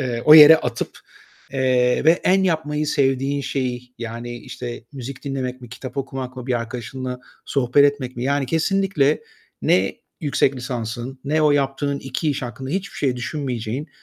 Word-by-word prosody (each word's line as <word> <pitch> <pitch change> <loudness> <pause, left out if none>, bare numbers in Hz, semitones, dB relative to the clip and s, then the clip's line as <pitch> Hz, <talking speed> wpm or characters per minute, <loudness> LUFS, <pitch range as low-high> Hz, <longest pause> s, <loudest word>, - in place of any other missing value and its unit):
...eee, 120 -3 -2
o 150 - +10
yere 155 +1 +11
atıp, 125 -5 -4 0.5
eee, 130 -1 +2
ve 160 - +7
en 190 +1 +4
yapmayı 155 -4 0
sevdiğin 140 0 +1
şeyi 125 -2 -3
yani 120 +1 -6
işte 120 +1 -7
müzik 135 0 -8
dinlemek 130 -2 -3
mi, 120 - -10
kitap 125 +2 -9
okumak 130 -1 -4
mı, 125 0 -7
bir 125 - 0
arkadaşınla 125 +1 -6 0.3
sohbet 140 +1 +3
etmek 140 -3 0
mi 120 - -3
yani 140 -1 +1
kesinlikle 165 -2 +1 0.4
ne 95 +1 +2 0.2
yüksek 140 -3 +1
lisansın 125 0 -5
ne 155 +2 +1
o 150 - +5
yaptığın 140 0 0
iki 135 +4 -2
iş 140 - -3
hakkında 130 +3 -6
hiçbir 195 +3 -3
şey 130 -3 0
düşünmeyeceğin, 125 +1 -4
135 Hz, 160 wpm, -22 LUFS, 125-145 Hz, 0.5 s, yere